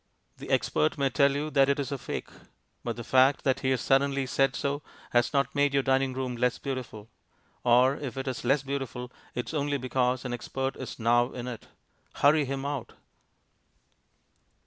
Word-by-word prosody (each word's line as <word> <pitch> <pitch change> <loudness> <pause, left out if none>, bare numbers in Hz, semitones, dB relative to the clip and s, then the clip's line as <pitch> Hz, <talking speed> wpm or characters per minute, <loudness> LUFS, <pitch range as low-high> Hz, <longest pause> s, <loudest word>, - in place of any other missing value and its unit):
The - - -9
expert 155 - +1
may 135 -2 +1
tell 140 -1 +3
you 150 +2 -2
that 140 -1 +4
it 140 - +1
is 140 0 -3
a 140 - -1
fake, - - -5 0.5
but 120 -1 -3
the 120 - -6
fact 130 +3 +4
that 130 -1 +2
he 130 - 0
has 130 -2 +1
suddenly 135 0 +2
said 135 +1 +1
so 140 +1 -2 0.3
has 120 -1 +3
not 140 -2 +1
made 145 -1 +2
your 135 - +3
dining 135 0 +2
room 130 -1 -3
less 125 +1 +1
beautiful. 125 -6 -6 0.6
Or 125 +3 +4
if 135 -2 -6
it 135 0 -4
is 130 - -3
less 135 +3 +2
beautiful, 130 -3 -4 0.2
it 125 - -3
is - - -7
only 145 -1 0
because 130 -1 0
an 125 - -3
"expert" 135 +2 -3
is 130 - -7
now 120 +2 +3
in 125 -1 -6
it. 120 -3 -7 0.5
Hurry 145 +1 +4
him 135 +1 -4
out. 140 -4 -4
135 Hz, 190 wpm, -28 LUFS, 125-140 Hz, 0.6 s, that